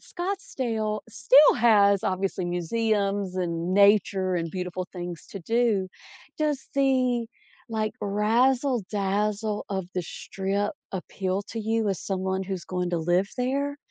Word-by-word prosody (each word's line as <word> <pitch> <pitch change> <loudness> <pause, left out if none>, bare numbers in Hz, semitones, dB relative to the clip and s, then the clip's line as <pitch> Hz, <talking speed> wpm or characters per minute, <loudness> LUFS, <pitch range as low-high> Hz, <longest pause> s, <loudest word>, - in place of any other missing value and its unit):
Scottsdale 250 - -3
still 255 +6 +6
has 200 -4 +4
obviously 185 0 -1
museums 200 +2 0
and 170 -1 -2
nature 200 -2 +4
and 165 -2 -2
beautiful 180 0 -4
things 175 -2 -6
to 195 - -7
do. 225 -1 +1 0.5
Does 300 -3 -1
the, 255 -4 +2 0.4
like, 215 -1 -1
razzle-dazzle 210 -2 +1
of 190 -2 -2
the 180 - -1
strip 195 +4 -3 0.2
appeal 190 +1 -3
to 225 - -5
you 220 0 0
as 195 - -1
someone 190 0 -2
who's 190 -2 -5
going 180 -1 -2
to 175 - 0
live 175 +4 +1
there, 280 +3 -1
200 Hz, 125 wpm, -26 LUFS, 185-230 Hz, 0.5 s, still